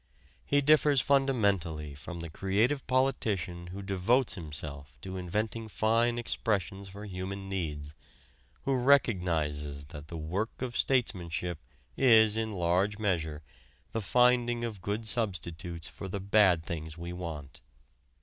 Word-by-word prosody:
He 145 0 +3
differs 150 -1 +5
fundamentally 100 - +1
from 85 +5 -7
the 85 - -6
creative 105 - +1
politician 105 -10 0
who 95 +3 -7
devotes 100 +7 +2
himself 70 -5 -7
to 95 +4 -6
inventing 105 +5 -2
fine 115 +3 +2
expressions 100 -4 -2
for 100 +2 -9
human 95 0 -5
needs, 75 -6 -4 0.7
who 135 -1 +1
recognizes 85 - +2
that 75 -1 -8
the 85 - -6
work 95 +11 -3
of 120 -2 -4
statesmanship 90 - 0 0.4
is 110 -5 +6
in 110 0 -1
large 95 +3 +1
measure 80 -7 -1 0.5
the 115 - -2
finding 120 +1 +3
of 110 -5 -4
good 105 +3 -2
substitutes 85 -6 -3
for 95 - -8
the 100 +2 -4
bad 95 -4 +4
things 80 -1 -5
we 85 +1 -6
want. 80 -6 -7
95 Hz, 130 wpm, -30 LUFS, 85-115 Hz, 0.7 s, is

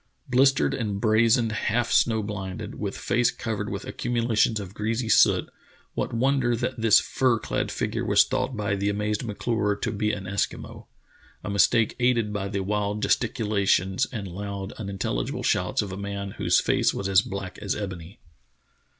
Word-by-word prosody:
Blistered 135 +2 +3
and 105 -5 -2
brazened, 115 +1 +3
half 115 +2 0
snow 110 -2 +3
blinded, 95 -3 -5
with - - -4
face - - +1
covered - - -4
with - - -5
accumulations 115 -2 0
of 100 -2 -8
greasy 110 +2 -2
soot, - - +4 0.5
what - - -2
wonder 125 0 +1
that 120 0 -3
this 115 -2 +6
fur 130 -3 +1
clad - - -2
figure - - -2
was - - +5
thought 125 - -2
by 100 -1 -1
the 100 +1 -1
amazed 105 +1 -1
M'Clure 105 -1 -1
to - - -3
be 105 +1 0
an 100 -2 -4
Eskimo, 100 +1 -4 0.6
a 100 - -4
mistake 110 +3 +3
aided 120 -4 +2
by 100 -1 -2
the 100 0 -2
wild 105 +1 -1
gesticula 110 -4 0
tions 95 +1 +2
and 105 -6 -5
loud, 100 +1 -5
unintelligible 95 - -3
shouts 90 +4 +1
of 100 - -6
a 95 - -6
man 100 0 -5
whose - - +3
face - - +1
was 95 - -2
as 95 -1 +5
black 100 -2 -6
as - - -2
ebony. 95 -3 -7
105 Hz, 165 wpm, -25 LUFS, 100-115 Hz, 0.6 s, this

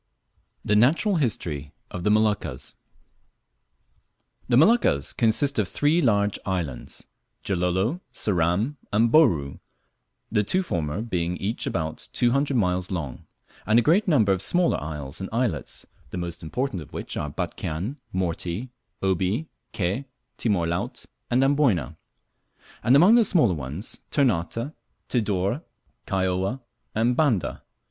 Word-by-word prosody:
THE 105 - +2
NATURAL 165 - +4
HISTORY 75 - -2 0.2
OF 90 - -5
THE 105 - +2
MOLUCCAS. 105 -11 +1 1.8
THE 120 - +5
Moluccas 160 - +4
consist 120 +4 +2
of 105 - +1
three 150 - +2
large 105 - +2
islands, 85 -9 -4 0.4
Gilolo, 95 - 0
Ceram, 100 - 0
and 115 +3 +3
Bouru, 85 - +4 0.7
the 105 -1 +3
two 185 - +1
former 85 - -2
being 90 -5 -2
each 105 +4 -3
about 80 -1 -3
two 120 -1 +3
hundred 140 0 +1
miles 90 -3 0
long; 80 -9 -5 0.4
and 110 +2 +4
a 120 - +5
great 180 - +3
number 115 - +4
of 95 -1 +1
smaller 175 -1 +2
isles 75 0 -6
and 95 - -4
islets, 115 - -2 0.2
the - - -6
most 85 -1 -5
important 95 +4 -3
of 75 - -13
which - - -5
are 75 - -2
Batchian, 90 - -4
Morty, 90 +5 -2 0.3
Obi, 95 - 0 0.2
Ke, 100 +5 -1 0.3
Timor 100 -7 +1
Laut, 85 +1 -3 0.2
and 125 +2 +3
Amboyna; 120 - +2 0.9
and 125 - +4
among 180 +10 +7
the 235 -1 +7
smaller 155 - +3
ones, 75 - -6
Ternate, 115 - 0 0.4
Tidore, 105 - 0 0.5
Kaióa, 95 +5 0 0.4
and 115 +3 +2
Banda. 120 - +1
105 Hz, 130 wpm, -25 LUFS, 85-130 Hz, 1.8 s, among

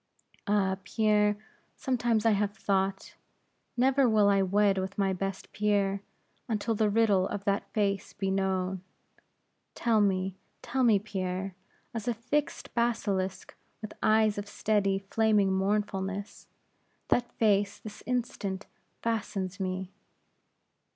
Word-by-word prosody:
Ah, 195 -2 +2
Pierre, 210 -1 +2 0.4
sometimes 240 -4 0
I 225 - +6
have 205 0 0
thought, 195 -1 -1 0.6
never 265 +1 +4
will 210 -2 +4
I 195 -1 +4
wed 195 +1 +3
with 190 +1 -4
my 195 -2 +2
best 195 +1 -4
Pierre, 200 -2 +1 0.5
until 225 +1 0
the 215 0 +2
riddle 205 -3 +3
of 200 - -4
that 200 0 0
face 200 -2 0
be 195 -1 -2
known. 190 -1 0 0.9
Tell 225 -2 +2
me, 190 -2 +1 0.3
tell 260 +2 -1
me, 225 -4 +6
Pierre; 190 -2 -3 0.4
as 225 -1 -5
a 240 - +1
fixed 255 +6 -2
basilisk, 205 -5 -1 0.3
with 215 - -7
eyes 215 -1 +3
of 205 - -6
steady, 205 -2 +1
flaming 205 0 +2
mournfulness, 195 0 -2 0.6
that 240 0 +2
face 205 -2 +2
this 215 - -10
instant 220 -6 -2 0.4
fastens 200 -4 -2
me." 185 0 -3
205 Hz, 125 wpm, -29 LUFS, 195-220 Hz, 0.9 s, I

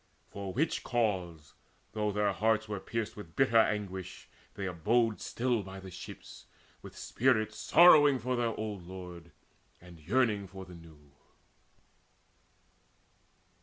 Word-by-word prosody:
For 100 -1 -5
which 155 - -1
cause, 90 - -2 0.4
though 105 -1 -1
their 105 0 +1
hearts 110 +2 +1
Were 105 -2 -4
pierced 115 +2 -4
with 85 -6 -11
bitter 125 -4 +4
anguish, 95 -4 -2 0.3
they 100 - -4
abode 110 +6 +1
Still 120 -2 -1
by 95 0 -9
the 95 -1 -10
ships, 90 - -11 0.3
with - - -12
spirits 110 -4 0
sorrowing 150 -4 +7
For 125 +1 -2
their 120 -2 -1
old 105 -5 -5
lord, 90 -2 -9 0.5
and 85 -1 -14
yearning 105 - +1
for 95 0 -10
the 90 - -13
new. 80 -4 -16
105 Hz, 130 wpm, -31 LUFS, 90-115 Hz, 0.5 s, sorrowing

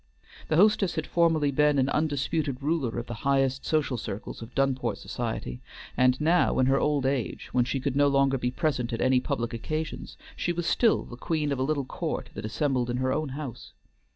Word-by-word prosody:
The 155 - +1
hostess 200 0 +4
had 160 - -2
formerly 165 -4 +2
been 150 +1 +3
an 130 -1 +3
undisputed 145 -2 -1
ruler 145 -7 0
of 120 - -3
the 120 - -6
highest 135 -1 +1
social 150 -5 +1
circles 105 0 -6
of 115 +2 -10
Dunport 130 -4 0
society, 60 0 -4 0.3
and 125 0 +3
now 165 +4 +3
in 130 - +4
her 135 +1 +3
old 145 -3 +1
age, 135 -3 -2
when 125 -1 +2
she 135 +2 -1
could 135 0 -2
no 145 0 +4
longer 135 -1 +2
be 125 - 0
present 125 -2 -1
at 115 - -2
any 130 0 +4
public 125 -3 -2
occasions, 155 +7 -4 0.2
she 175 - -1
was 170 0 -3
still 230 +4 +3
the 120 - -10
queen 150 +1 -1
of 140 - -1
a - - +1
little 140 -1 0
court - - -4
that 105 - -6
assembled 125 +1 0
in 120 - -1
her 130 0 0
own 155 -1 -1
house. 140 -7 -7
135 Hz, 205 wpm, -27 LUFS, 125-155 Hz, 0.3 s, hostess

